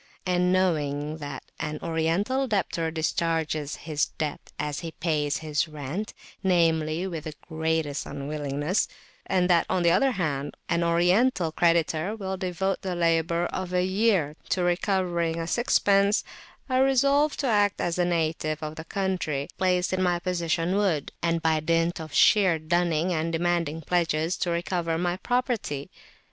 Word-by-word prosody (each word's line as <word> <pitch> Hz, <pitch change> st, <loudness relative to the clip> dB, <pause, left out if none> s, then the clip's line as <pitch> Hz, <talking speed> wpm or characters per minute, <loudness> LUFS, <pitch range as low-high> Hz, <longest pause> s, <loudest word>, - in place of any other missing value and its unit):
And 180 Hz, 0 st, +2 dB
knowing 155 Hz, -5 st, 0 dB
that 145 Hz, -4 st, -7 dB, 0.2 s
an 150 Hz, 0 st, -3 dB
Oriental 170 Hz, +11 st, 0 dB
debtor 185 Hz, -6 st, 0 dB
discharges 160 Hz, -2 st, -1 dB
his 150 Hz, -3 st, -1 dB
debt 155 Hz, -2 st, -5 dB
as 150 Hz, -1 st, -3 dB
he 165 Hz, -1 st, -6 dB
pays 150 Hz, -4 st, 0 dB
his 150 Hz, +2 st, 0 dB
rent, 155 Hz, +7 st, -5 dB, 0.3 s
namely, 165 Hz, -2 st, +2 dB
with 165 Hz, -4 st, -5 dB
the 155 Hz, -1 st, -6 dB
greatest 160 Hz, -3 st, -1 dB
unwillingness, 145 Hz, +4 st, -2 dB, 0.4 s
and 180 Hz, -2 st, +2 dB
that, 175 Hz, -2 st, +3 dB
on 180 Hz, -, +1 dB
the 170 Hz, -, +5 dB
other 270 Hz, +10 st, +4 dB
hand, 145 Hz, -7 st, -2 dB
an 170 Hz, 0 st, +1 dB
Oriental 175 Hz, +3 st, +3 dB
creditor 170 Hz, +3 st, +1 dB
will 190 Hz, -3 st, -4 dB
devote 190 Hz, 0 st, -2 dB
the 185 Hz, -2 st, -3 dB
labour 170 Hz, 0 st, +1 dB
of 185 Hz, -1 st, -4 dB
a 180 Hz, -, +3 dB
year 185 Hz, -6 st, +1 dB
to 180 Hz, -, +1 dB
recovering 175 Hz, -2 st, 0 dB
a 165 Hz, -, -2 dB
sixpence, 200 Hz, -1 st, +3 dB, 0.4 s
I 255 Hz, -1 st, +1 dB
resolved 275 Hz, +3 st, +3 dB
to 275 Hz, -, 0 dB
act 205 Hz, -3 st, +2 dB
as 175 Hz, 0 st, -1 dB
a -, -, +4 dB
native 160 Hz, -2 st, -1 dB
of 155 Hz, 0 st, -5 dB
the 160 Hz, -, -7 dB
country, 175 Hz, -8 st, -2 dB
placed 180 Hz, 0 st, +1 dB
in 185 Hz, -, 0 dB
my 180 Hz, -1 st, +2 dB
position, 175 Hz, 0 st, -1 dB
would; 180 Hz, -9 st, 0 dB
and 165 Hz, 0 st, 0 dB
by 160 Hz, -1 st, +3 dB
dint 165 Hz, +2 st, 0 dB
of 155 Hz, -1 st, -8 dB
sheer 190 Hz, -2 st, +5 dB
dunning 170 Hz, +1 st, +1 dB
and 165 Hz, 0 st, -1 dB
demanding 165 Hz, -2 st, 0 dB
pledges, 165 Hz, 0 st, 0 dB
to 175 Hz, -, -1 dB
recover 170 Hz, -1 st, -1 dB
my 175 Hz, +1 st, -1 dB
property. 240 Hz, -, -2 dB
170 Hz, 155 wpm, -26 LUFS, 155-185 Hz, 0.4 s, the